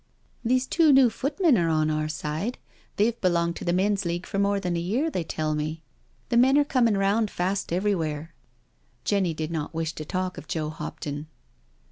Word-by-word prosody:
" - - -38
These 255 +2 +2
two 320 +2 +4
new 265 -3 +6
footmen 280 - +2
are 165 -1 +1
on 155 -1 +2
our 155 0 -1
side 155 - -3 0.2
— - - -33
they've 230 +3 +1
belonged 170 -2 +1
to - - -7
the 175 - +1
Men's 200 +2 +1
League 175 +1 -2
for 195 - -3
more 200 0 +2
than 180 -3 -2
a - - 0
year, 235 - 0
they 180 - -1
tell 155 -1 -2
me. 155 +2 -3 0.5
The 235 - +2
men 265 +3 +5
are 290 - +5
coming 235 -7 +2
round 205 +3 +2
fast 190 +1 -2
every 195 +4 +1
where." 155 -2 -3 0.7
Jenny 190 -5 +1
did 155 +1 -3
not 160 -1 -4
wish 165 0 -2
to 155 - -6
talk 185 +3 -3
of - - -13
Joe 155 -2 -2
Hopton. 150 -1 -6
180 Hz, 205 wpm, -26 LUFS, 160-225 Hz, 0.7 s, new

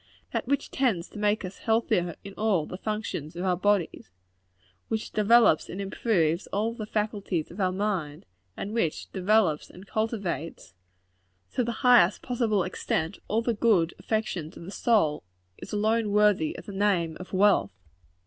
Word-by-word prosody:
That - - -2
which 280 +1 -1
tends 225 -11 0
to 210 - -9
make 210 -1 +1
us 185 +2 -8
healthier 220 -7 +1
in 200 - -9
all 200 -8 +1
the - - -7
functions 210 -8 -4
of 175 +2 -3
our 180 -1 +2
bodies 190 - 0 0.8
which 220 0 -3
developes 215 -5 +4
and 185 - -6
improves 190 -4 0
all 220 +3 -1
the 215 -2 -6
faculties 205 -6 -2
of 180 - -11
our 185 -1 +2
minds 185 -7 -2 0.3
and 205 - -5
which 170 -10 -1
developes 190 -5 +2
and 185 +2 -13
cultivates, 205 - -3 0.8
to 250 - +1
the 235 - -2
highest 235 -7 +5
possible 230 -6 +1
extent, 170 -1 -2
all 225 +3 0
the 235 - +1
good 205 -7 +2
affections 190 -8 -3
of - - -10
the 185 - -8
soul 200 -11 +2 0.4
is - - -9
alone 215 +1 +1
worthy 205 -6 +3
of - - -10
the - - -7
name 190 -5 +1
of 185 - -9
wealth. 190 - +3
205 Hz, 160 wpm, -27 LUFS, 175-220 Hz, 0.8 s, highest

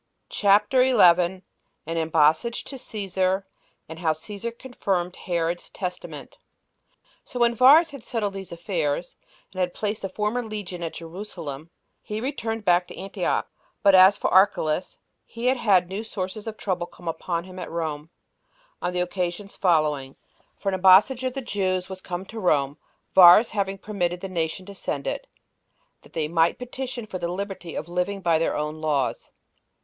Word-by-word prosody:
CHAPTER 210 +5 +4
11. 185 -7 +4 0.4
An 165 +1 -3
Embassage 160 +7 +2
To 275 - -8
Cæsar; 195 -4 -1 0.4
And 160 +1 -9
How 160 -2 +2
Cæsar 210 +8 -7
Confirmed 190 -9 -2
Herod's 170 -1 -2
Testament. 180 -2 -7 0.6
1. - - -50 0.3
So 250 - -7
when 235 0 +4
Varus 290 +8 +6
had 280 -5 -10
settled 215 -5 -2
these 195 -1 -8
affairs, 170 -2 -2 0.4
and 185 - -8
had 180 -1 -1
placed 210 0 -2
the 195 - -3
former 210 +5 -1
legion 205 -5 -6
at 165 -1 -4
Jerusalem, 165 -4 -7 0.3
he 210 0 -5
returned 225 -4 -3
back 180 -1 +3
to - - -11
Antioch; 195 +1 -2 0.4
but 200 -1 +6
as 190 +2 +8
for - - -1
Archelaus, 185 -3 +3 0.3
he 230 +1 -8
had 215 -9 +3
new 195 +4 -4
sources 205 0 -5
of 220 -1 -5
trouble 180 -3 -2
come 175 - -14
upon 170 +1 -2
him 185 0 -10
at - - -6
Rome, 160 -2 -4 0.7
on 180 - -2
the 180 - 0
occasions 180 +2 -3
following: 150 -6 +1 0.4
for 200 - -2
an - - -2
embassage 195 +8 +6
of 255 -1 -1
the 270 - -4
Jews 185 -5 -1
was 190 -1 -7
come 180 0 -5
to 225 +3 -8
Rome, 145 -7 +1 0.3
Varus 185 +5 +8
having 195 -2 -1
permitted 180 -4 -2
the 195 - -5
nation 170 +1 -3
to 200 - -10
send 195 - -4
it, - - -3 0.7
that - - -20
they 155 -2 -1
might 165 +1 +2
petition 250 -1 -6
for 190 -3 -6
the 170 0 -2
liberty 190 -3 -5
of 155 - -4
living 180 +3 -2
by 170 -3 +2
their 165 - 0
own 150 +1 -4
laws. 145 -4 -1
185 Hz, 165 wpm, -25 LUFS, 170-210 Hz, 0.7 s, as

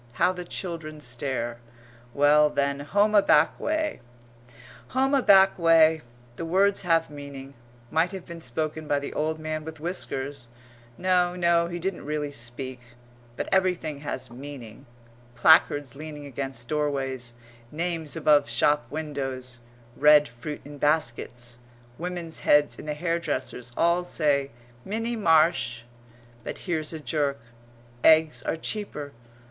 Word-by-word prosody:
How 150 - +3
the 180 -1 -6
children 165 -4 -5
stare! 125 -2 -3 0.5
Well, 150 +3 +5
then 140 -1 0
home 205 +9 +2
a 205 - +7
back 155 -5 +3
way 315 0 -1 1.0
"Home 270 +1 +3
a 275 - +4
back 195 -4 +6
way!" 160 -1 +5 0.4
The - - -4
words 195 +4 +2
have 165 -3 +1
meaning; 140 -1 -9 0.4
might 165 +3 +2
have 190 -3 -7
been 170 0 -9
spoken 155 +4 -3
by 145 - +2
the 140 - -5
old 155 +1 -1
man 155 0 -4
with 160 0 -9
whiskers 140 -6 -4 0.5
no, 180 -1 +2
no, 170 -1 +2
he 175 0 -5
didn't 185 +1 -3
really 150 0 -3
speak; 120 -1 -6 0.4
but - - -3
everything 180 -6 +1
has 130 -3 -4
meaning 125 -4 -10 0.5
placards 145 +1 +4
leaning 150 0 -8
against 135 -3 -5
doorways 135 -5 -2 0.4
names 165 -1 -3
above 150 -4 +3
shop 145 +5 +2
windows 135 -5 -5 0.4
red 150 +1 +6
fruit 120 +6 -7
in 145 0 -10
baskets 120 -5 -1 0.4
women's 175 -1 -3
heads 145 0 +3
in - - -9
the 150 - -2
hairdresser's 150 -7 -2
all 170 +1 +3
say 145 -5 +1 0.3
"Minnie 225 +4 -2
Marsh!" 155 - +2 0.6
But - - -5
here's 160 -4 -1
a 160 - -6
jerk. 145 -2 -1 0.6
"Eggs 160 -1 +5
are - - -2
cheaper!" 160 -6 -5
150 Hz, 135 wpm, -26 LUFS, 140-170 Hz, 1.0 s, a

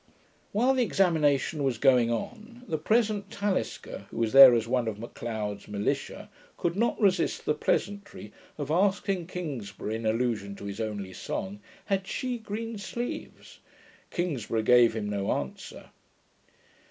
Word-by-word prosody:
While 245 +6 +3
the 260 - +1
examination 160 - +2
was 130 -4 0
going 125 -2 +4
on, 225 - -5
the 155 - -2
present 215 +2 +1
Talisker, 205 -2 -3
who - - -10
was 115 0 0
there 135 -2 +11
as 115 -1 0
one 125 -1 0
of 110 -2 -3
M'Leod's 110 -2 -5
militia, 105 0 -3 0.3
could 170 0 -1
not 235 +4 +1
resist 190 -6 +1
the 150 - +2
pleasantry 200 - -2 0.2
of 145 -1 -4
asking 190 0 +1
Kingsburgh, 130 - -5
in 110 0 -2
allusion 110 -3 -1
to 100 - -9
his 100 +2 -5
only 100 -4 -4
song, 195 - -5 0.3
'Had 195 -2 -1
she 250 +2 -3
GREEN 220 +1 -5
SLEEVES?' 235 +5 -6 0.5
Kingsburgh 125 - -2
gave 120 -1 +6
him 105 -2 -2
no 100 -1 -1
answer. 70 -2 -6
145 Hz, 140 wpm, -28 LUFS, -, 0.5 s, there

